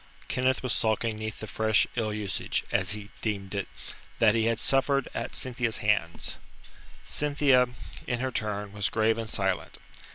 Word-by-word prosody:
Kenneth 130 0 +1
was 125 -3 +1
sulking 110 -1 0
'neath 110 0 -5
the - - -3
fresh 110 0 +2
ill 110 -3 0
usage 105 -2 -1
as - - +2
he 105 -1 -7
deemed 100 -3 -2
it 100 -1 -2 0.5
that 110 -2 +5
he 115 -1 +2
had 115 0 +1
suffered 135 +1 +3
at - - -4
Cynthia's 125 -3 0
hands. 100 -5 0 0.7
Cynthia, 140 - +3 0.4
in 125 -2 0
her 130 +1 -1
turn, 105 -3 -2
was 105 0 0
grave 110 +1 +2
and 115 -1 -3
silent. 95 -3 -1
110 Hz, 160 wpm, -28 LUFS, 105-125 Hz, 0.7 s, that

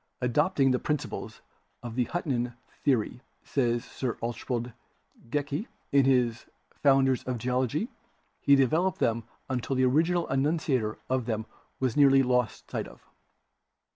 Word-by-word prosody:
Adopting 135 +2 +2
the 125 - +2
principles 150 -2 -3 0.4
of 120 -2 -5
the 125 +1 +1
Huttonian 125 -8 -2 0.3
the 140 -3 +5
ory, 120 +2 -4 0.2
says 120 -3 0
Sir 125 -3 -4
Archibald 120 +1 -3 0.6
Geikie 145 - -2 0.2
in 140 -1 +5
his 125 -3 +2 0.3
'Founders 135 -2 +4
of 125 -1 -2
Ge 115 - -9
ology/ 130 - 0 0.5
he 140 - +5
developed 160 +7 +2
them 115 0 0 0.2
until 130 +1 -2
the 130 0 +3
original 165 +6 +2
enunciator 135 -5 0
of 130 -2 -1
them 110 -2 -1 0.3
was 130 -3 0
nearly 135 -2 +6
lost 125 -2 0
sight - - -2
of. - - -16
130 Hz, 140 wpm, -28 LUFS, 120-140 Hz, 0.6 s, nearly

